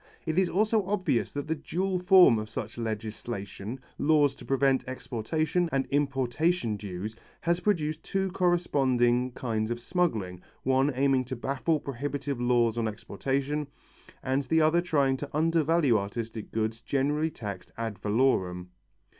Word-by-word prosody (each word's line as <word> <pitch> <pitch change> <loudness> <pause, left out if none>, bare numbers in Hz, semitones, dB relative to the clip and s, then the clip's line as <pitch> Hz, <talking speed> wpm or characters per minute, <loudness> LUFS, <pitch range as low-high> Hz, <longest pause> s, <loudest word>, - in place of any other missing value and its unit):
It 160 +2 +1
is 185 -2 +2
also 215 +2 +2
obvious 185 - 0
that 145 -1 -3
the 160 - +1
dual 180 +4 -2
form 180 - +7
of 110 0 -6
such 115 -1 -6
legislation, 110 0 -5 0.2
laws 145 -2 +4
to - - -13
prevent 135 -1 +2
exportation, 155 +8 -1
and 135 -1 +1
importation 140 0 +1
dues, 100 +1 -6 0.3
has 170 +1 +1
produced 155 -6 0
two 195 -1 -1
corresponding 130 -9 +2
kinds 110 -3 -2
of 120 0 -2
smuggling, 120 - -1
the - - -21 0.3
one 135 +2 +3
aiming 135 -1 +2
to 130 - -4
baffle 140 +6 0
prohibitive 140 0 -4
laws 120 -2 +2
on 115 - 0
exportation, 135 +7 -2 0.6
and 130 +2 +1
the 160 +3 +2
other 160 +2 +4
trying 140 -6 +2
to 145 +1 -6
undervalue 160 -6 +3
artistic 110 +2 -5
goods 110 +1 -2
generally 145 +5 0
taxed 100 - -7
ad 115 -4 -4
valorem. 100 -5 +1
135 Hz, 145 wpm, -28 LUFS, 115-160 Hz, 0.6 s, form